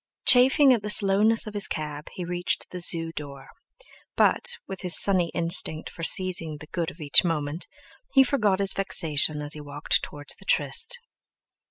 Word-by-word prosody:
Chafing 265 +2 +5
at 235 - -1
the 210 - -6
slowness 210 +2 +4
of 215 - -9
his 205 -1 -1
cab, 150 -1 -6
he 180 - -7
reached 175 0 -4
the 180 - -7
Zoo 165 -1 0
door; 140 -3 -10 0.7
but, 475 - +1
with 190 -1 -8
his 180 -3 +4
sunny 185 -4 +2
instinct 165 -2 -1
for - - -12
seizing 165 -3 +2
the 150 - -13
good 170 +1 -4
of 165 - -16
each 145 -1 +4
moment, 160 -1 -4 0.5
he 270 - +7
forgot 215 -8 0
his 195 0 +1
vexation 155 -6 +1
as 145 - -4
he 150 - -9
walked 145 0 -2
towards 145 0 -5
the - - -17
tryst. 485 +2 0
175 Hz, 175 wpm, -24 LUFS, 150-200 Hz, 0.7 s, he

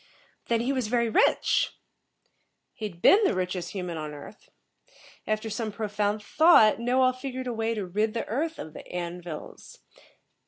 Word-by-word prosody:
"Then, 230 -1 +1
he 260 +4 0
was 255 -5 -1
very 235 0 +1
rich?" - - +2 1.0
"He'd 200 -6 -7
been 420 +3 +7
the 390 - +2
richest 180 -1 -3
human 180 -4 -4
on 150 -1 -6
Earth. 175 +8 -13 0.8
After 215 +1 -1
some 220 0 -3
profound 210 0 -2
thought, 270 -8 +5
Knowall 255 +2 +2
figured 255 0 -6
a 245 - -3
way 225 0 -1
to 205 -3 -3
rid 210 +5 -1
the 230 - -2
earth 315 +8 -2
of 155 - -8
the - - -9
An 175 0 -5
vils." 170 -3 -9
215 Hz, 160 wpm, -27 LUFS, 185-245 Hz, 1.0 s, been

